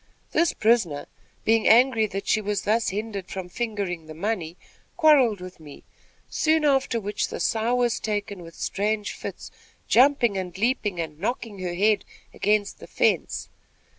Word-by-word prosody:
This 335 -1 +2
prisoner, 200 -11 +1 0.4
being 225 0 +3
angry 230 -1 +5
that 195 0 -5
she 220 - +2
was 205 0 -2
thus 220 +2 +1
hindered 205 -1 -4
from 185 -2 -6
fingering 200 -6 -3
the 155 - -9
money, 180 -2 -3 0.4
quarrelled 280 - +5
with 180 -1 -10
me; 150 -3 -13 0.4
soon 315 -1 +1
after 270 -4 +2
which 205 -1 -2
the - - -6
sow 225 +2 +1
was 245 -2 +1
taken 205 -3 -3
with 165 -1 -12
strange 210 +1 -2
fits, - - -8 0.4
jumping, 250 -3 +4 0.2
leaping 210 -4 0
and 155 -2 -5
knocking 215 0 -3
her 180 -1 -3
head 205 +2 +2 0.3
against 205 -1 0
the - - -11
fence. - - 0
210 Hz, 150 wpm, -25 LUFS, 190-235 Hz, 0.4 s, angry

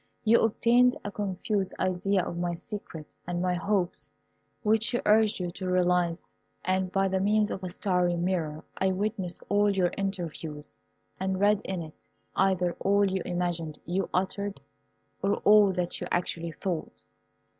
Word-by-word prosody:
You 230 +1 +5
obtained 240 +3 +4
a 205 - -4
confused 195 0 -2
idea 185 +1 +1
of - - -4
my 175 0 -1
secret 170 -4 -8 0.2
and 175 -1 -2
my 180 0 +1
hopes, 185 0 0 0.5
which 220 +1 +3
she 240 - +1
urged 215 0 +4
you 175 -1 -2
to 185 +1 -4
realize, 180 -2 +1 0.3
and 185 0 0
by 195 0 +2
the 190 0 0
means 210 +1 +2
of 190 - -5
a 185 - -3
starry 180 -1 +1
mirror 170 -3 -1 0.2
I 190 0 +2
witnessed 195 -2 -3
all 205 0 +3
your 185 -3 +2
interviews, 165 -6 -4 0.4
and 190 0 -1
read 205 +1 +4
in 185 -3 -3
it 155 -1 -10 0.4
either 185 -2 +2
all 200 +1 +3
you 190 -1 -1
imagined 175 -3 -2
you 185 +4 -1
uttered 200 +2 -1 0.6
or 200 +1 +2
all 210 -1 +7
that 180 -1 -2
you - - -3
actually 170 -1 -1
thought. 170 +1 -4
185 Hz, 155 wpm, -28 LUFS, 175-205 Hz, 0.6 s, all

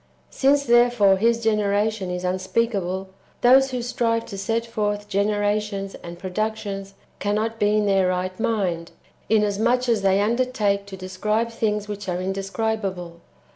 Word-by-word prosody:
Since 280 +1 +3
therefore 240 -5 +5
His 230 +3 +2
generation 210 -2 +1
is 180 0 -4
unspeakable, 190 0 -1 0.3
those 265 +2 +6
who 250 -2 -3
strive 230 -1 0
to - - -8
set 225 +3 -1
forth 210 -2 -2
generations 205 0 -1
and 170 0 -9
productions 195 +1 -4 0.2
cannot 215 +2 -1
be 210 +1 +3
in 210 - +2
their 195 -2 +3
right 185 +1 -2
mind, 180 -7 -1 0.4
inasmuch 220 +4 +2
as 230 -3 +2
they 195 0 +3
undertake 210 -3 0
to 190 -1 -8
describe 210 +5 -1
things 210 -2 -1
which 205 -2 -5
are 180 0 -1
indescribable. 195 -2 -3
205 Hz, 135 wpm, -23 LUFS, 195-225 Hz, 0.4 s, those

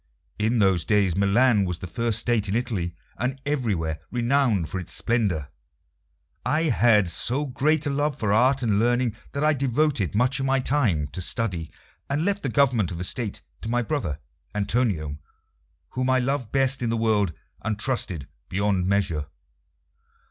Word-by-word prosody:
In 110 +3 +1
those 95 -5 +3
days 100 -5 +2
Milan 105 +3 +3
was 90 -2 -2
the 95 - -7
first 110 +6 0
State 110 -2 0
in 100 - 0
Italy, 100 -8 -2 0.2
and 130 +2 -2
everywhere 100 - -1
renowned 120 - +1
for 95 - -4
its 90 - -7
splendour. 100 - 0 0.9
I 155 +2 +1
had 105 -5 +4
so 125 - +1
great 150 +3 +1
a 145 - 0
love 145 0 0
for 105 -5 0
art 130 +4 +3
and 105 -3 +2
learning 120 0 +1 0.2
that 140 - -1
I 155 0 +4
devoted 135 - 0
much 125 +5 +2
of 135 - -1
my 135 0 +2
time 120 - +1
to 85 +5 -6
study, 90 -4 -1 0.4
and 145 +4 0
left 200 0 0
the 135 - -2
government 125 - +2
of 85 - -5
the 90 - -3
State 105 +2 -3 0.2
to 110 - -5
my 120 +1 +1
brother 110 - -2 0.4
Antonio, 100 - 0 0.7
whom 130 0 -1
I 130 - +4
loved 130 -2 -1
best 135 -1 +2
in 120 - 0
the 115 - 0
world 110 -5 +2 0.3
and 110 -1 -2
trusted 105 - -1 0.2
beyond 95 -1 0
measure. 90 -7 0
115 Hz, 170 wpm, -25 LUFS, 95-130 Hz, 0.9 s, had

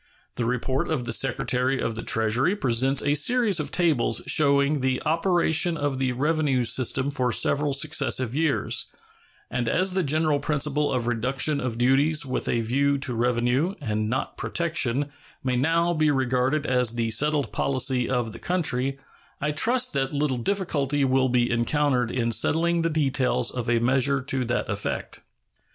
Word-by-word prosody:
The 120 - -3
report 125 +2 -1
of 155 -6 -1
the 120 -1 -1
Secretary 130 +1 0
of 115 - -2
the 110 - -5
Treasury 115 - +1
presents 130 - 0
a 145 - +2
series 205 - +2
of 150 - -3
tables 145 -10 +1
showing 140 -1 +2
the 130 0 0
operation 170 0 +1
of 145 -2 -2
the 130 -1 0
revenue 145 -1 0
system 130 +3 +1
for 125 -3 -1
several 145 +4 +1
successive 135 -4 0
years; 155 -1 0 0.6
and 120 -2 -1
as 185 +8 +1
the 190 - +1
general 155 -1 +1
principle 150 0 -1
of 125 -3 -1
reduction 125 +5 0
of 120 -3 -3
duties 135 +5 +2
with 130 - -2
a 120 - +1
view 140 +5 +1
to 135 -2 -2
revenue, 125 - 0
and 110 -6 -2
not 130 +4 -3
protection, 145 -5 -1 0.3
may 130 -1 0
now 165 +6 +1
be 155 -2 +2
regarded 130 +2 0
as 125 -3 +1
the 115 -1 -1
settled 145 +1 +1
policy 130 -2 0
of 120 -4 -1
the - - -10
country, 135 -7 -1 0.4
I 150 +1 -1
trust 240 +11 +1
that 135 -1 -1
little 145 -3 -1
difficulty 145 -4 0
will 130 0 +2
be 120 -1 +1
encountered 125 +1 +1
in 120 -1 -1
settling 170 +7 +1
the 165 - 0
details 135 -5 0
of 125 -1 -4
a 120 - +3
measure 130 +3 +2
to 130 -1 -2
that 120 - -2
effect. 100 -1 -4
135 Hz, 165 wpm, -25 LUFS, 125-150 Hz, 0.6 s, a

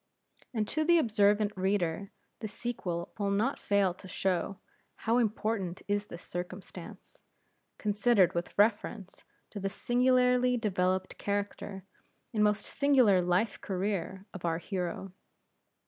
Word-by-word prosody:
And 215 -4 -1
to 310 - +1
the 345 +2 +5
observant 210 -5 +3
reader 190 -1 0 0.3
the 220 - -4
sequel 200 -6 -4
will 200 -1 +1
not 215 +8 +1
fail 200 -3 +2
to 190 - -13
show, 190 +1 -1 0.4
how 230 +2 +1
important 210 -5 -1
is 205 0 0
this 170 - -9
circumstance, 180 +2 -8 0.6
considered 210 -2 +3
with 170 0 -4
reference 205 -1 +1 0.3
to 205 - -6
the 195 0 -1
singularly 250 +2 +3
developed 185 -4 0
character 200 -1 -3 0.5
and 210 -1 +2
most 210 0 +2
singular 255 -10 +4
life 180 +4 +1
career 190 -1 -2
of 190 - -8
our 165 -1 +1
hero. 180 +1 -4
205 Hz, 125 wpm, -31 LUFS, 185-225 Hz, 0.6 s, the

